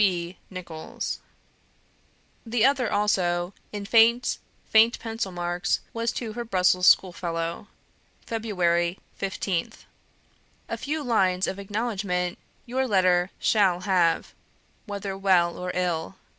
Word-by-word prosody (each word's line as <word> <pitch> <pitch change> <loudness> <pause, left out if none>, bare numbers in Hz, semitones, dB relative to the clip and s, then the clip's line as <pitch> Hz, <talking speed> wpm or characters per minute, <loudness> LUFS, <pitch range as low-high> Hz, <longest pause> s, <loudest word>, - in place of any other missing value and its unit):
"C. 175 -4 +1
B. 185 - -21
NICHOLLS." 170 -4 -6 1.2
The 230 -1 +2
other 270 -4 +2
also 180 -3 +1 0.2
in 205 -1 -5
faint, 230 +3 +4 0.3
faint 225 +2 +5
pencil 225 -4 -4
marks 175 0 -1
was 230 0 -1
to 225 -3 -4
her 240 +2 -4
Brussels 185 -4 +3
schoolfellow. 170 0 +2 0.6
"Feb. 180 -6 0 0.2
15th. 190 -2 -3 0.8
"A - - -3
few 300 +1 -3
lines 190 -7 +2
of 190 - -4
acknowledgment 200 -4 -2 0.3
your 260 +2 -1
letter 185 -3 +3
SHALL 190 -5 +2
have, 180 -4 +1 0.5
whether 200 -1 -4
well 185 -3 +3
or 180 0 -4
ill. 175 -1 -1
190 Hz, 115 wpm, -26 LUFS, 175-220 Hz, 1.2 s, faint